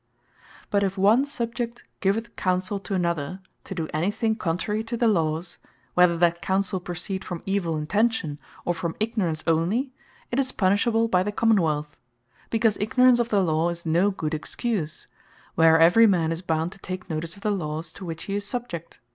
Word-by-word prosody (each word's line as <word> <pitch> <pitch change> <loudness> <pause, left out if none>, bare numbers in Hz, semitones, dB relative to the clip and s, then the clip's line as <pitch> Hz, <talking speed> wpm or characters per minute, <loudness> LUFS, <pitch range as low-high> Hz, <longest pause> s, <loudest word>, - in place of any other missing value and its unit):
But 200 - +3
if 195 0 -1
one 215 +8 +4
Subject 235 -3 -4 0.2
giveth 220 +4 -1
Counsell 185 +1 0
to 195 - -2
another, 170 -1 -1 0.3
to 195 - -6
do 165 -3 -2
any 160 +5 +1
thing 220 +1 0
contrary 210 +3 -1
to 235 +1 -3
the 235 - +3
Lawes, 165 -3 0 0.3
whether 180 -1 +4
that 170 0 +2
Counsell 190 +2 0
proceed 180 +2 -5
from 175 -2 -6
evill 190 -5 0
intention, 165 -2 0 0.3
or 175 - +1
from 170 -1 -3
ignorance 205 -8 -1
onely, 175 - +1 0.4
it 245 - +1
is 260 -1 0
punishable 220 +4 +2
by 180 -4 +3
the 205 +3 -1
Common 220 -1 +3
wealth; 150 -2 -2 0.5
because 225 -2 +2
ignorance 250 +3 +4
of 240 0 0
the 200 -3 +3
Law, 160 0 +1
is 170 0 -5
no 170 +5 +3
good 160 -5 -3
excuse, 165 +1 -3 0.5
where 160 0 +6
every 175 +8 +7
man 170 -5 +2
is 165 +1 -3
bound 165 -1 -1
to 195 - -13
take 185 -1 -6
notice 165 0 -4
of 200 - -15
the 210 - +1
Lawes 160 -3 -3
to 200 - -10
which 165 -2 -5
he 200 - -4
is 205 0 -1
subject. 205 -7 -5
185 Hz, 185 wpm, -25 LUFS, 165-215 Hz, 0.5 s, every